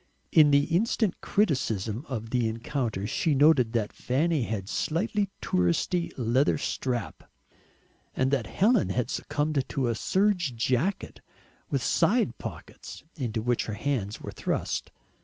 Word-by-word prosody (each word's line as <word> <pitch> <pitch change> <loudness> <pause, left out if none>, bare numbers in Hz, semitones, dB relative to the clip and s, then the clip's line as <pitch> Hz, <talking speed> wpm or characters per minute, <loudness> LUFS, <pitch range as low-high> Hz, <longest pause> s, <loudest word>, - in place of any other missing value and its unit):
In 155 -3 +7
the 140 0 +5
instant 195 +4 0
criticism 120 - 0
of 115 -3 -5
the 125 -2 +1
encounter 115 -3 -3
she 150 - 0
noted 135 -5 +4
that 110 -3 -1
Fanny 150 +4 0
had 110 -4 -2
a - - -17
slightly 200 - -1
"touristy" 90 - +1
leather 125 +3 +2
strap, 120 - -3 0.9
and 130 +1 +1
that 125 -7 0
Helen 220 +3 +2
had 125 - -1
succumbed 145 -2 -1
to 130 -3 -1
a - - +1
serge 180 - +1
jacket 130 - -1 0.5
with - - -1
side - - +2
pockets, - - -9
into 115 -7 -3
which 120 0 0
her 110 - -3
hands 110 -6 -2
were - - -7
thrust. - - -2
130 Hz, 140 wpm, -27 LUFS, 115-160 Hz, 0.9 s, In